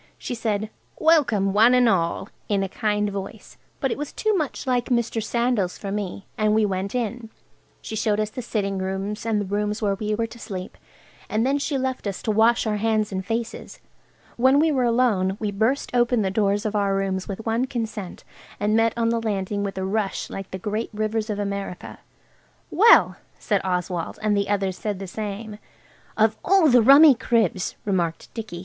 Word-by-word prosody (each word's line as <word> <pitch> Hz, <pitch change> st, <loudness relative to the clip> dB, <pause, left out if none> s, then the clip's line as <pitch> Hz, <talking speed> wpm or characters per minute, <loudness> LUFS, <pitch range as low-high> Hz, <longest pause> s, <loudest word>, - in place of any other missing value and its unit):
She -, -, -5 dB
said, 220 Hz, -2 st, -2 dB, 0.3 s
"Welcome, 240 Hz, -12 st, +3 dB
one 225 Hz, +4 st, +6 dB
and 250 Hz, -1 st, +4 dB
all!" 185 Hz, 0 st, 0 dB, 0.2 s
in 200 Hz, -2 st, +1 dB
a -, -, -1 dB
kind 210 Hz, +1 st, -1 dB
voice, 195 Hz, -1 st, -8 dB, 0.2 s
but 270 Hz, -, 0 dB
it -, -, -3 dB
was 295 Hz, -, -4 dB
too 435 Hz, -1 st, 0 dB
much 310 Hz, -7 st, -2 dB
like 250 Hz, -2 st, +1 dB
Mr. 235 Hz, -2 st, 0 dB
Sandal's 235 Hz, -5 st, 0 dB
for 200 Hz, -, -6 dB
me. 200 Hz, -1 st, -4 dB
And 215 Hz, 0 st, +3 dB
we 220 Hz, -1 st, +3 dB
went 195 Hz, +2 st, -3 dB
in. 235 Hz, -1 st, -3 dB, 0.5 s
She 220 Hz, -, -5 dB
showed 210 Hz, -1 st, 0 dB
us 215 Hz, 0 st, -1 dB
the 255 Hz, -, -5 dB
sitting 200 Hz, -4 st, -2 dB
rooms, 195 Hz, +3 st, -3 dB
and 220 Hz, -2 st, +1 dB
the 205 Hz, -, -2 dB
rooms 210 Hz, +2 st, -2 dB
where 205 Hz, -3 st, +1 dB
we 210 Hz, +2 st, -2 dB
were 230 Hz, +1 st, -1 dB
to 235 Hz, +1 st, -11 dB
sleep, 185 Hz, -4 st, -7 dB, 0.5 s
and 220 Hz, +2 st, +1 dB
then 275 Hz, +2 st, +1 dB
she 280 Hz, 0 st, -1 dB
left 260 Hz, -4 st, -2 dB
us 195 Hz, -, -5 dB
to 220 Hz, -, 0 dB
wash 225 Hz, +3 st, +3 dB
our 215 Hz, -1 st, 0 dB
hands 215 Hz, -1 st, 0 dB
and 190 Hz, 0 st, -3 dB
faces. 225 Hz, +3 st, -4 dB, 0.6 s
When 260 Hz, +3 st, +4 dB
we 315 Hz, +2 st, +3 dB
were 260 Hz, -4 st, +1 dB
alone 225 Hz, -6 st, +2 dB
we 210 Hz, -2 st, -2 dB
burst 225 Hz, +7 st, 0 dB
open 240 Hz, -2 st, +2 dB
the 190 Hz, -, -1 dB
doors 205 Hz, +1 st, +1 dB
of 215 Hz, 0 st, -2 dB
our 200 Hz, -1 st, +1 dB
rooms 190 Hz, -1 st, -2 dB
with 205 Hz, +2 st, -6 dB
one 230 Hz, +3 st, +1 dB
consent, 225 Hz, -7 st, -5 dB, 0.4 s
and 210 Hz, +1 st, +1 dB
met 225 Hz, 0 st, +3 dB
on 230 Hz, -1 st, +1 dB
the 230 Hz, 0 st, 0 dB
landing 200 Hz, -2 st, -2 dB
with 195 Hz, -1 st, -4 dB
a 190 Hz, -, -2 dB
rush 200 Hz, 0 st, -2 dB
like 195 Hz, -1 st, -6 dB
the 190 Hz, -, -5 dB
great 210 Hz, +4 st, -3 dB
rivers 215 Hz, +1 st, -1 dB
of 210 Hz, -, -2 dB
America. 200 Hz, -2 st, -5 dB, 0.7 s
"Well!" 460 Hz, +5 st, +6 dB, 0.2 s
said 205 Hz, -3 st, 0 dB
Oswald, 180 Hz, -2 st, -2 dB
and 210 Hz, -1 st, +2 dB
the 200 Hz, 0 st, 0 dB
others 195 Hz, -2 st, -1 dB
said 210 Hz, -2 st, -3 dB
the 195 Hz, -, -6 dB
same. 210 Hz, +2 st, -6 dB, 0.6 s
"Of 220 Hz, 0 st, +2 dB
all 370 Hz, -4 st, +4 dB
the 245 Hz, -2 st, +6 dB
rummy 280 Hz, +5 st, +8 dB
cribs!" 225 Hz, -7 st, 0 dB
remarked 175 Hz, -5 st, -2 dB
Dicky. 220 Hz, -7 st, -6 dB
215 Hz, 195 wpm, -23 LUFS, 195-235 Hz, 0.7 s, rummy